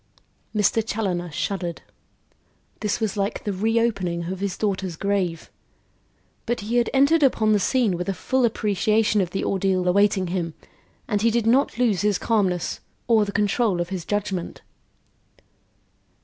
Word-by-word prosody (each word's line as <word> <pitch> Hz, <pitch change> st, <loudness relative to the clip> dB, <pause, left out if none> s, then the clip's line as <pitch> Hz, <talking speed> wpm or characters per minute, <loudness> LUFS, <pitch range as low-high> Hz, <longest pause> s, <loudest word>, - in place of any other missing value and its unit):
Mr. 210 Hz, +2 st, +3 dB
Challoner 190 Hz, -5 st, -2 dB
shuddered. 175 Hz, +2 st, -3 dB, 1.0 s
This 210 Hz, 0 st, -1 dB
was 220 Hz, -2 st, -2 dB
like 200 Hz, +2 st, -2 dB
the 205 Hz, -, -2 dB
reopening 200 Hz, -4 st, 0 dB
of 190 Hz, -, -8 dB
his 195 Hz, -2 st, -3 dB
daughter's 190 Hz, -4 st, -2 dB
grave. 185 Hz, -3 st, -2 dB, 1.0 s
But 240 Hz, -1 st, -1 dB
he 225 Hz, +4 st, -1 dB
had 240 Hz, -, +2 dB
entered 280 Hz, +4 st, +4 dB
upon 220 Hz, -6 st, +3 dB
the 210 Hz, -, +3 dB
scene 230 Hz, -2 st, +1 dB
with 180 Hz, +2 st, -3 dB
a 195 Hz, -, -1 dB
full 260 Hz, +6 st, 0 dB
appreciation 215 Hz, -1 st, +2 dB
of 180 Hz, -, -1 dB
the 195 Hz, -, -3 dB
ordeal 190 Hz, -1 st, 0 dB
awaiting 190 Hz, -1 st, +2 dB
him 170 Hz, -4 st, -2 dB, 0.5 s
and 205 Hz, -1 st, 0 dB
he 230 Hz, -, +4 dB
did 230 Hz, 0 st, 0 dB
not 255 Hz, +4 st, +2 dB
lose 230 Hz, -7 st, +2 dB
his 205 Hz, -2 st, +2 dB
calmness, 190 Hz, -6 st, 0 dB, 0.3 s
or 225 Hz, -3 st, +4 dB
the 200 Hz, -, -4 dB
control 205 Hz, -1 st, +1 dB
of 175 Hz, -, -2 dB
his 185 Hz, -3 st, -4 dB
judgment. 195 Hz, -2 st, -3 dB
205 Hz, 150 wpm, -23 LUFS, 185-225 Hz, 1.0 s, entered